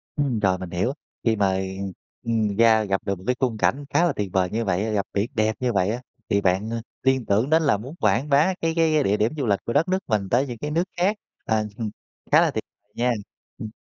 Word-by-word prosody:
Ừm, 140 Hz, -6 st, 0 dB
rồi, 95 Hz, -3 st, +2 dB
mình 90 Hz, -1 st, -7 dB
hiểu, 95 Hz, +10 st, -1 dB, 0.3 s
khi 115 Hz, -1 st, +2 dB
mà, 100 Hz, -2 st, +2 dB
ừm, 95 Hz, +1 st, -4 dB, 0.3 s
ừm, 110 Hz, -3 st, 0 dB
ra 110 Hz, -1 st, +5 dB
gặp 95 Hz, -2 st, -1 dB
được 100 Hz, -1 st, -1 dB
một 90 Hz, -, -14 dB
cái 125 Hz, -, +2 dB
khung 125 Hz, -4 st, 0 dB
cảnh 140 Hz, +6 st, +1 dB
khá 175 Hz, -, +3 dB
là 175 Hz, -, +1 dB
tuyệt 100 Hz, -2 st, -3 dB
vời 95 Hz, -1 st, +2 dB
như 115 Hz, +1 st, -1 dB
vậy 95 Hz, +1 st, 0 dB
á, 110 Hz, -, -2 dB
gặp 100 Hz, -2 st, 0 dB
biển 100 Hz, +4 st, 0 dB
đẹp 110 Hz, 0 st, +1 dB
như 125 Hz, -2 st, 0 dB
vậy 95 Hz, -1 st, +2 dB
á 120 Hz, +3 st, -2 dB, 0.3 s
thì 100 Hz, -, +2 dB
bạn, 95 Hz, +3 st, +1 dB
a, 115 Hz, -, -2 dB, 0.2 s
liên 130 Hz, -2 st, +2 dB
tưởng 105 Hz, +7 st, +1 dB
đến 160 Hz, +1 st, +4 dB
là 140 Hz, -8 st, +3 dB
muốn 130 Hz, +10 st, -9 dB
quảng 110 Hz, +7 st, +1 dB
bá 150 Hz, +7 st, +4 dB
cái 165 Hz, 0 st, +1 dB
cái 155 Hz, -3 st, +3 dB
địa 100 Hz, +2 st, +2 dB
điểm 110 Hz, +2 st, +1 dB
du 140 Hz, -, -1 dB
lịch 100 Hz, -3 st, +2 dB
của 115 Hz, -, -2 dB
đất 165 Hz, -, +3 dB
nước 185 Hz, +1 st, +1 dB
mình 105 Hz, -5 st, 0 dB
tới 125 Hz, +6 st, +2 dB
những 120 Hz, -2 st, -6 dB
cái 150 Hz, +5 st, -4 dB
nước 165 Hz, +3 st, +2 dB
khác, 195 Hz, +5 st, +2 dB, 0.3 s
ờ, 110 Hz, -, +2 dB
ừm 110 Hz, 0 st, -1 dB
hừm, 110 Hz, -2 st, -2 dB, 0.4 s
khá -, -, +7 dB
là -, -, +3 dB
tuyệt -, -, -3 dB, 0.3 s
nha. 125 Hz, +1 st, +1 dB, 0.5 s
Ừm. 110 Hz, -, -6 dB
110 Hz, 265 wpm, -24 LUFS, 100-135 Hz, 0.5 s, khá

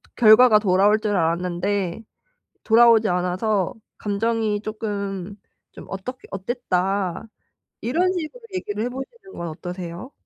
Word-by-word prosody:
결과가 220 Hz, 0 st, +7 dB
돌아올 205 Hz, +1 st, +3 dB
줄 210 Hz, -1 st, -1 dB
알았는데 180 Hz, +3 st, -1 dB, 0.6 s
돌아오지 230 Hz, -1 st, +6 dB
않아서 180 Hz, +2 st, 0 dB, 0.2 s
감정이 215 Hz, 0 st, -1 dB
쪼끔 200 Hz, -3 st, -4 dB, 0.4 s
좀 -, -, -11 dB
어떻게 250 Hz, +7 st, -7 dB
어땠다." 195 Hz, -3 st, -1 dB, 0.6 s
이런 350 Hz, +11 st, +1 dB
식으로 350 Hz, +6 st, -5 dB
얘기를 215 Hz, -, -3 dB
해 -, -, -1 dB
보시는 385 Hz, -, -9 dB
건 170 Hz, -1 st, -4 dB
어떠세요? 175 Hz, -, -7 dB
205 Hz, 275 characters per minute, -23 LUFS, 185-230 Hz, 0.6 s, 결과가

